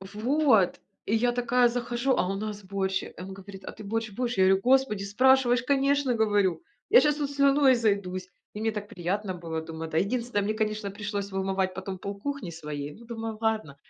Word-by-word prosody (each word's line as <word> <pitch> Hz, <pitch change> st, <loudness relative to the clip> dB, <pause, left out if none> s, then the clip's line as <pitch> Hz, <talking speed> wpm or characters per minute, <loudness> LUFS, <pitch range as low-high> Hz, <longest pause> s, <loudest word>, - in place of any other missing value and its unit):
Вот! 220 Hz, -, +2 dB, 0.3 s
И 215 Hz, -, +1 dB
я 240 Hz, +2 st, +2 dB
такая 245 Hz, 0 st, +3 dB
захожу, 240 Hz, +2 st, -1 dB
а 180 Hz, -, +1 dB
у 195 Hz, -, -1 dB
нас 210 Hz, 0 st, -5 dB
борщ. 190 Hz, 0 st, -1 dB
Э, -, -, -9 dB
и -, -, -6 dB
он 190 Hz, +1 st, -7 dB
говорит: 195 Hz, 0 st, -11 dB
"А -, -, -6 dB
ты 215 Hz, -, -11 dB
борщ 220 Hz, +2 st, -2 dB
будешь?" 245 Hz, +1 st, -2 dB
Я 190 Hz, -, +6 dB
говорю: 190 Hz, +1 st, +4 dB
"Господи, 260 Hz, -5 st, +3 dB
спрашиваешь, 250 Hz, +3 st, +4 dB
конечно!- 275 Hz, 0 st, +2 dB
говорю,- 205 Hz, -6 st, +1 dB, 0.3 s
Я 465 Hz, -, +8 dB
щас 295 Hz, -1 st, +2 dB
тут 290 Hz, -2 st, -2 dB
слюной 280 Hz, -1 st, +4 dB
изойдусь!" 200 Hz, -6 st, 0 dB, 0.3 s
И 210 Hz, -, -6 dB
мне 225 Hz, +1 st, +1 dB
так 210 Hz, -1 st, -6 dB
приятно 185 Hz, +2 st, -3 dB
было, 165 Hz, -2 st, -4 dB
думаю, 160 Hz, 0 st, -7 dB
да 160 Hz, -, +1 dB
Единственное, 230 Hz, +2 st, 0 dB
мне, 210 Hz, +2 st, -1 dB
конечно, 215 Hz, -1 st, -2 dB
пришлось 205 Hz, 0 st, -4 dB
вымывать 190 Hz, -1 st, -1 dB
потом 190 Hz, 0 st, -6 dB
полкухни 200 Hz, +3 st, -5 dB
своей, 150 Hz, -3 st, -6 dB
ну 235 Hz, -, -15 dB
думаю, 225 Hz, -1 st, -5 dB
ладно, 220 Hz, -10 st, -1 dB
210 Hz, 200 wpm, -27 LUFS, 190-245 Hz, 0.3 s, Я